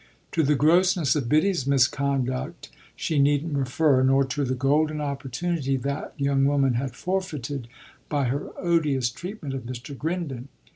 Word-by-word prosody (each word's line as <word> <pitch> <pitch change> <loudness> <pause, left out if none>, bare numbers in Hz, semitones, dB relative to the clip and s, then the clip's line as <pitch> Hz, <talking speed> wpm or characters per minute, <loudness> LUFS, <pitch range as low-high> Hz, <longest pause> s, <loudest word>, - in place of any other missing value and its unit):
To 165 - +1
the 150 0 +3
grossness 165 -1 +3
of 135 -6 -1
Biddy's 155 -1 +2
misconduct 135 -1 0 0.2
she 155 -3 -1
needn't 145 +2 +2
refer, 135 +1 +2
nor 135 +1 +4
to 135 +2 -2
the 130 -1 -1
golden 150 +4 +1
opportunity 140 +1 -2
that 140 +3 -4
young 140 -1 +2
woman 140 -2 +2
had 125 +1 -2
forfeited 150 -9 -3 0.4
by 145 -2 0
her 135 +4 -2
odious 150 -8 +1
treatment 175 - -7
of 130 -3 -5
Mr. 125 +3 -7
Grindon. 145 -5 -4
140 Hz, 145 wpm, -25 LUFS, 130-155 Hz, 0.4 s, nor